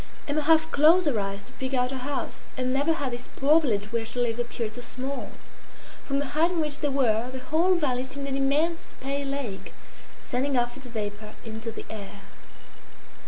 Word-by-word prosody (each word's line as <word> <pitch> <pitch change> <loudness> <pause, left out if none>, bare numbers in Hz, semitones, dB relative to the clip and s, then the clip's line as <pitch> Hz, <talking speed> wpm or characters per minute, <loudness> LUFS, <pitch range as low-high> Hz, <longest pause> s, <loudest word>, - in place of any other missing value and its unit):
Emma 300 +1 +1
half 320 +1 +4
closed 325 +5 +6
her 265 -8 +2
eyes 200 0 -3
to - - -15
pick 265 0 -2
out 250 0 +2
her 265 - -3
house, 280 +3 -4
and 255 0 0
never 285 +4 +3
had 285 -5 -2
this 245 +1 -6
poor 300 +4 +5
village 210 -7 0
where 230 -1 0
she 230 +2 -4
lived 240 -1 +1
appeared 235 -2 -2
so 245 - -7
small. 260 +3 -4 0.8
From 275 - 0
the 285 -1 -1
height 320 +3 +3
on 355 -2 -1
which 300 -2 -1
they 290 - +1
were 245 -4 +2
the 260 - -5
whole 320 +7 +3
valley 260 -7 +1
seemed 275 +1 -5
an 270 - -1
immense 295 +5 +1
pale 275 +1 -2
lake 275 -8 -4 0.4
sending 265 +2 -1
off 240 0 +1
its 270 -2 -9
vapour 210 -2 -5
into 225 +1 -5
the - - -8
air. 205 -2 -8
265 Hz, 200 wpm, -27 LUFS, 235-290 Hz, 0.8 s, closed